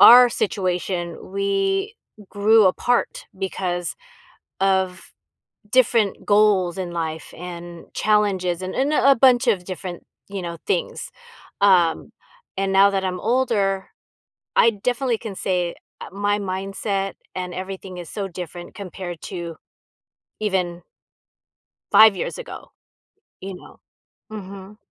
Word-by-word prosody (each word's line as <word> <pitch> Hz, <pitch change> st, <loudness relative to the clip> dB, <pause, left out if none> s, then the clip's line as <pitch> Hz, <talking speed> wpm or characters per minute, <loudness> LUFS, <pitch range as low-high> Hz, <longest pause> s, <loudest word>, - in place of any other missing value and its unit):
our 245 Hz, +1 st, +10 dB
situation, 180 Hz, -4 st, -2 dB
we 395 Hz, +1 st, 0 dB, 0.4 s
grew 215 Hz, +1 st, +5 dB
apart 245 Hz, +6 st, 0 dB
because 180 Hz, -2 st, -2 dB, 0.7 s
of 190 Hz, -1 st, 0 dB, 0.6 s
different 230 Hz, -4 st, +2 dB
goals 205 Hz, -4 st, +3 dB
in 185 Hz, -2 st, -3 dB
life 160 Hz, -2 st, -4 dB
and 175 Hz, -1 st, -8 dB
challenges 190 Hz, -4 st, +1 dB
and 185 Hz, 0 st, -4 dB
and 275 Hz, +3 st, +1 dB
a 275 Hz, -2 st, +5 dB
bunch 255 Hz, 0 st, +5 dB
of 195 Hz, -6 st, +2 dB
different, 180 Hz, -1 st, -6 dB, 0.3 s
you 200 Hz, -1 st, -4 dB
know, 170 Hz, -1 st, -5 dB
things. 415 Hz, -, -2 dB, 0.5 s
Um, 180 Hz, -5 st, +4 dB, 0.5 s
and 195 Hz, 0 st, 0 dB
now 195 Hz, +1 st, +7 dB
that 195 Hz, -1 st, -1 dB
I'm 185 Hz, -1 st, -2 dB
older, 210 Hz, -5 st, +1 dB, 0.7 s
I -, -, +6 dB
definitely 245 Hz, +3 st, -1 dB
can 215 Hz, -4 st, -7 dB
say, 180 Hz, -3 st, -1 dB, 0.3 s
uh, -, -, -7 dB
my 205 Hz, +1 st, 0 dB
mindset 195 Hz, +1 st, -3 dB, 0.2 s
and 180 Hz, -1 st, -4 dB
everything 185 Hz, 0 st, -6 dB
is 175 Hz, -, -7 dB
so 200 Hz, -2 st, -4 dB
different 175 Hz, -1 st, -8 dB
compared 185 Hz, -3 st, -7 dB
to 170 Hz, -3 st, -6 dB, 0.8 s
even 185 Hz, -5 st, -1 dB, 1.1 s
5 220 Hz, -2 st, +8 dB
years -, -, -4 dB
ago. -, -, -9 dB, 0.7 s
You 195 Hz, 0 st, -6 dB
know? -, -, -15 dB, 0.5 s
Mhm. 200 Hz, -1 st, -9 dB
195 Hz, 120 wpm, -22 LUFS, 180-215 Hz, 1.1 s, our